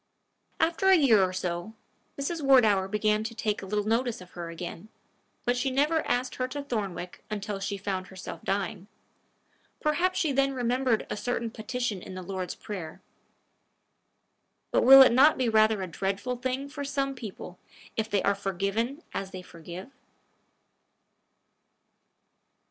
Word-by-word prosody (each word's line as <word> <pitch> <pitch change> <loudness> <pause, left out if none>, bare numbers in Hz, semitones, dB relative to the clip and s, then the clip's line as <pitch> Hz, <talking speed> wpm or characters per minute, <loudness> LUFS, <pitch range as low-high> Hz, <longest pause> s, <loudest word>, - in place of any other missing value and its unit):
After 335 +4 +2
a 380 - +8
year 260 - +5
or 185 - +1
so, 180 +3 -4 0.4
Mrs. 320 +4 -2
Wardour 220 -9 +5
began 210 +1 +1
to 225 +1 -5
take 215 -2 -1
a 195 - -8
little 210 +1 -1
notice 230 +2 0
of 180 -1 -13
her 170 -1 -6
again; 170 +4 -7 0.6
but 245 - +2
she 250 +2 0
never 295 +5 +2
asked 250 +1 -1
her 255 - -1
to 285 +2 -5
Thornwick 195 -9 -4
until 205 -1 -4
she 200 +1 -3
found 190 -1 -3
herself 190 -1 -8
dying. 200 0 -2 0.9
Perhaps 345 +5 +1
she 325 -6 +1
then 275 0 +1
remembered 250 -1 +1
a - - -1
certain 235 +1 -2
petition 230 -3 -3
in 185 - -9
the 185 - -6
Lord's 185 0 -4
prayer. 175 -7 -7 1.7
But - - +3
will 270 +1 +11
it 260 - +5
not 275 +6 +6
be 255 - +1
rather 215 -2 +3
a - - -4
dreadful 195 +8 -2
thing 260 +2 -3
for 285 0 -6
some 275 -1 -1
people 205 -7 -9 0.4
if 220 0 -1
they 200 -2 +1
are 200 - +3
forgiven 200 - -2
as 195 - -3
they 185 -1 -8
forgive? 175 - -10
220 Hz, 155 wpm, -28 LUFS, 195-260 Hz, 1.7 s, will